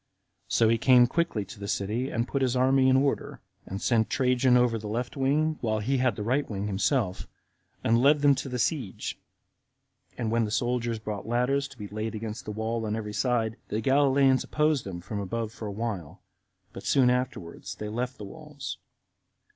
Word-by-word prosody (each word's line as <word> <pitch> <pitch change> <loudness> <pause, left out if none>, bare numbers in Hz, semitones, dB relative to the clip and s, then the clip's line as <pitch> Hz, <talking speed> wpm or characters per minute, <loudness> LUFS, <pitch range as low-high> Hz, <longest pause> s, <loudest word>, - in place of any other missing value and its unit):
So 115 - +3
he 115 +1 +3
came 125 0 +6
quickly 120 -6 -1
to 100 - -11
the 100 - -5
city, 110 +7 -1
and 115 +1 -1
put 140 - -2
his 130 -1 +1
army 130 +1 +4
in 130 - +5
order, 140 +1 0 0.3
and 95 - -4
set 110 -2 +2
Trajan 125 0 +3
over 120 -2 +2
the 105 - -7
left 120 +4 -3
wing, 150 +3 +1
while 110 -2 0
he 125 +6 0
had 125 -4 +2
the 105 - -4
right 130 +6 +1
himself, 105 +1 -1 0.6
and 115 +1 +3
led 145 +2 +5
them 145 -1 +6
to 135 0 -4
the 125 - -3
siege: 125 - -2 1.0
and 115 -3 -2
when 115 0 +2
the 105 - -2
soldiers 120 +2 0
brought 105 -1 -6
ladders 125 +4 +1
to 130 - -16
be 105 -3 -6
laid 110 +2 -4
against 110 0 -5
the - - -4
wall 110 +2 -2
on 105 - -1
every 105 -2 -5
side, 115 -2 0
the 105 - -2
Galileans 135 +1 +3
opposed 150 -3 +1
them 90 -3 -6
from 100 +3 -5
above 110 +3 -3
for 110 -1 -7
a - - -4
while; 100 -7 -5 0.5
but - - -8
soon 130 -3 +3
afterward 125 -10 -3
they 105 - -5
left 125 +4 -3
the 105 - -7
walls. 95 - -8
120 Hz, 195 wpm, -27 LUFS, 105-130 Hz, 1.0 s, came